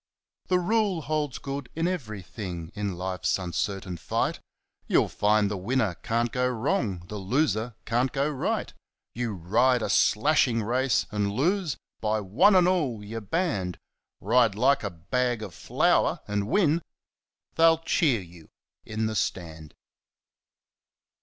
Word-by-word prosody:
The 180 Hz, -, +3 dB
rule 200 Hz, -1 st, +1 dB
holds 150 Hz, -3 st, -2 dB
good 140 Hz, -2 st, -5 dB
in 165 Hz, +2 st, 0 dB
everything 100 Hz, -, -5 dB
in 100 Hz, -3 st, -3 dB
life's 90 Hz, 0 st, -1 dB
uncertain 95 Hz, +1 st, -3 dB
fight; 80 Hz, -, -1 dB, 0.5 s
You'll -, -, +3 dB
find 105 Hz, 0 st, +2 dB
the 100 Hz, 0 st, -3 dB
winner 110 Hz, +1 st, 0 dB
can't 115 Hz, +6 st, -1 dB
go 125 Hz, 0 st, +1 dB
wrong, 110 Hz, -7 st, -1 dB
the 105 Hz, -, -6 dB
loser 110 Hz, +1 st, 0 dB
can't 120 Hz, +4 st, +1 dB
go 140 Hz, +1 st, 0 dB
right. 145 Hz, -3 st, -2 dB, 0.4 s
You 120 Hz, -2 st, -2 dB
ride 110 Hz, +8 st, +2 dB
a 100 Hz, -, -1 dB
slashing 115 Hz, +1 st, +3 dB
race, 125 Hz, +3 st, +1 dB
and 105 Hz, -1 st, 0 dB
lose 165 Hz, -, 0 dB, 0.2 s
by 110 Hz, 0 st, 0 dB
one 105 Hz, -, +4 dB
and 180 Hz, -1 st, +5 dB
all 145 Hz, -, 0 dB
you're 115 Hz, +2 st, -5 dB
banned! 105 Hz, -, -1 dB, 0.4 s
Ride 115 Hz, +2 st, +3 dB
like 135 Hz, +6 st, +3 dB
a 100 Hz, -, -1 dB
bag 120 Hz, +7 st, -1 dB
of 100 Hz, -4 st, -7 dB
flour, -, -, +1 dB
and 105 Hz, -1 st, -1 dB
win 165 Hz, -, +2 dB, 0.7 s
they'll 165 Hz, 0 st, +5 dB
cheer 155 Hz, -, +1 dB
you 85 Hz, -3 st, -15 dB, 0.3 s
in 110 Hz, 0 st, -3 dB
the 110 Hz, -, -1 dB
Stand. 80 Hz, -7 st, -3 dB
115 Hz, 140 wpm, -27 LUFS, 100-140 Hz, 0.7 s, and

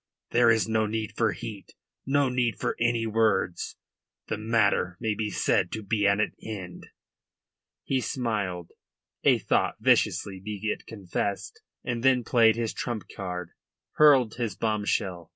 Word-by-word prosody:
there 120 Hz, -1 st, +5 dB
is 115 Hz, -1 st, +3 dB
no 110 Hz, -1 st, +1 dB
need 110 Hz, -1 st, -3 dB
for 110 Hz, -2 st, +2 dB
heat, 110 Hz, -4 st, -8 dB, 0.3 s
no 140 Hz, 0 st, +3 dB
need 125 Hz, -2 st, 0 dB
for -, -, -1 dB
any 120 Hz, -1 st, +1 dB
words. 110 Hz, -5 st, 0 dB, 0.5 s
The -, -, -1 dB
matter 105 Hz, -5 st, +1 dB
may 110 Hz, -2 st, 0 dB
be 105 Hz, 0 st, -2 dB
said -, -, +1 dB
to 110 Hz, -, -4 dB
be 100 Hz, 0 st, +1 dB
at 100 Hz, +1 st, +3 dB
an 105 Hz, -, 0 dB
end." 95 Hz, -5 st, -7 dB, 1.0 s
He 130 Hz, -1 st, 0 dB
smiled 105 Hz, -, -3 dB, 0.5 s
a -, -, +5 dB
thought -, -, +1 dB
viciously, 95 Hz, -2 st, +2 dB
be 105 Hz, -1 st, -5 dB
it -, -, -14 dB
confessed 100 Hz, -1 st, -4 dB, 0.2 s
and 120 Hz, -1 st, -3 dB
then 130 Hz, -1 st, +3 dB
played 115 Hz, -2 st, +4 dB
his 115 Hz, -1 st, -2 dB
trump 120 Hz, -4 st, -4 dB
card, 90 Hz, -3 st, -5 dB, 0.4 s
hurled 135 Hz, -7 st, +5 dB
his 115 Hz, -6 st, -2 dB
bombshell. 100 Hz, -5 st, -1 dB
110 Hz, 150 wpm, -27 LUFS, 100-120 Hz, 1.0 s, there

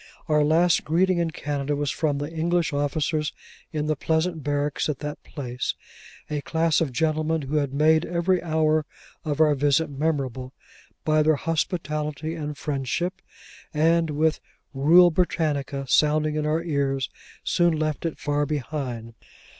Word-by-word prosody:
Our 150 Hz, -1 st, +3 dB
last 165 Hz, +3 st, +3 dB
greeting 180 Hz, +3 st, +2 dB
in 170 Hz, -1 st, +1 dB
Canada 145 Hz, -2 st, -2 dB
was 145 Hz, -1 st, -1 dB
from 150 Hz, -3 st, 0 dB
the 145 Hz, +3 st, -4 dB
English 165 Hz, 0 st, 0 dB
officers 150 Hz, +1 st, -1 dB, 0.4 s
in 150 Hz, -2 st, -2 dB
the 155 Hz, 0 st, +1 dB
pleasant 160 Hz, +2 st, -1 dB
barracks 145 Hz, +1 st, -1 dB
at 150 Hz, -, -1 dB
that 150 Hz, +1 st, -6 dB
place 125 Hz, -4 st, -4 dB, 0.5 s
(a 150 Hz, -1 st, -3 dB
class 160 Hz, +1 st, +1 dB
of 155 Hz, -5 st, 0 dB
gentlemen 155 Hz, +3 st, 0 dB
who 140 Hz, +3 st, -1 dB
had 140 Hz, -3 st, 0 dB
made 155 Hz, +3 st, +4 dB
every 175 Hz, +2 st, +1 dB
hour 155 Hz, -2 st, +1 dB, 0.4 s
of 150 Hz, -2 st, -2 dB
our 155 Hz, -1 st, +5 dB
visit 145 Hz, +2 st, +2 dB
memorable 135 Hz, -3 st, -2 dB, 0.5 s
by 155 Hz, 0 st, +3 dB
their 155 Hz, 0 st, +4 dB
hospitality 155 Hz, -1 st, -2 dB
and 150 Hz, -3 st, -5 dB
friendship); 150 Hz, +6 st, -2 dB, 0.5 s
and 165 Hz, +1 st, +3 dB
with 155 Hz, +1 st, +1 dB, 0.3 s
'Rule 170 Hz, +6 st, +6 dB
Britannia' 145 Hz, -5 st, -1 dB
sounding 150 Hz, +2 st, +3 dB
in 150 Hz, 0 st, -1 dB
our 160 Hz, +2 st, 0 dB
ears, 140 Hz, -5 st, -1 dB, 0.3 s
soon 175 Hz, -2 st, +2 dB
left 155 Hz, -1 st, -2 dB
it 165 Hz, -2 st, -3 dB
far 145 Hz, 0 st, 0 dB
behind. 130 Hz, -6 st, -4 dB
155 Hz, 145 wpm, -25 LUFS, 145-160 Hz, 0.5 s, Rule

